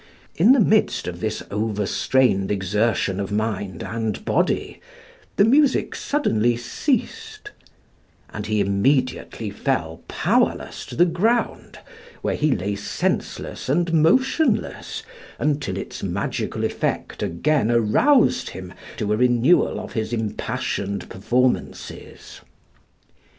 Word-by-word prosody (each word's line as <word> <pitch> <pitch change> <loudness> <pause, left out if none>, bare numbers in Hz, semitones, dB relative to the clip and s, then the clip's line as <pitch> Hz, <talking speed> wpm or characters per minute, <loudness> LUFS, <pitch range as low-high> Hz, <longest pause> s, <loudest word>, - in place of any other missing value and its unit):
In 210 +10 +6
the 270 - +4
midst 215 0 +2
of 85 -1 -5
this 110 +2 -3
over 105 0 -1
strained 100 -4 +2
exertion 100 0 0
of 100 0 -3
mind 105 -4 -2
and 115 - -3
body - - 0 0.5
the 200 - +5
music 275 +3 +3
suddenly 120 - +1
ceased, 420 - -3 0.8
and - - -5
he 110 -1 +1
immediately 110 +1 0
fell 90 - -2
powerless - - 0
to - - -8
the 175 - +5
ground, 220 +8 0 0.5
where - - 0
he 155 - +1
lay 100 +3 -2
senseless 100 +4 -3
and 170 +4 +1
motionless 260 - +1 0.3
until 150 -1 -1
its - - -6
magical - - -3
effect - - -2
again 135 - +1
aroused 125 - +3
him 90 -1 -9 0.2
to 105 -1 0
a - - +1
renewal 125 +7 +3
of - - -8
his 110 0 -2
impassioned 100 -3 -3
performances. 125 +6 -2
120 Hz, 115 wpm, -22 LUFS, 105-170 Hz, 0.8 s, In